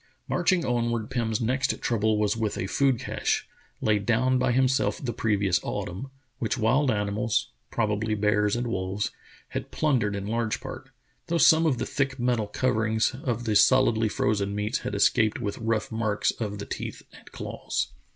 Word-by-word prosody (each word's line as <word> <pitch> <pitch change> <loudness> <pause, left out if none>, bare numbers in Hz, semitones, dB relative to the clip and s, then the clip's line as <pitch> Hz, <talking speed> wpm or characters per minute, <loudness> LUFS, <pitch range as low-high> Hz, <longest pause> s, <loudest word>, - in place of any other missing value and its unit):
Marching 180 0 +2
onward, 120 -2 -1
Pim's 110 -3 0
next 130 +4 0
trouble 110 -2 +1
was 105 0 +1
with 110 -2 -2
a - - -2
food 135 +5 +2
cache, - - -1 0.3
laid 105 -2 +2
down 130 +3 +2
by 130 -1 +2
himself 130 +2 +2
the 120 -3 -4
previous 100 -5 +1
autumn, 95 +10 -4 0.3
which 110 -3 0
v,7ild 130 +4 +2
animals 105 +1 0
— - - -47
probably 110 +1 0
bears 105 0 +2
and 120 +1 -1
wolves 100 -2 -2 0.2
— - - -25
had - - -5
plundered 125 -9 +1
in 100 -1 -4
large 115 0 -1
part, - - -8 0.4
though 170 - +1
some 160 0 +6
of 135 -5 +1
the - - -2
thick 135 -1 -1
metal 120 -3 0
coverings 110 0 +1
of 120 -2 -1
the 110 -2 0
solidly 115 -3 +4
frozen 100 -1 0
meats 105 +1 -1
had - - -4
escaped 110 -1 +3
with 105 -4 -3
rough 115 +2 -1
marks 110 -2 0
of 105 -3 -4
the 100 - -6
teeth - - -6
and - - -15
claws. - - -3
110 Hz, 175 wpm, -26 LUFS, 105-125 Hz, 0.4 s, some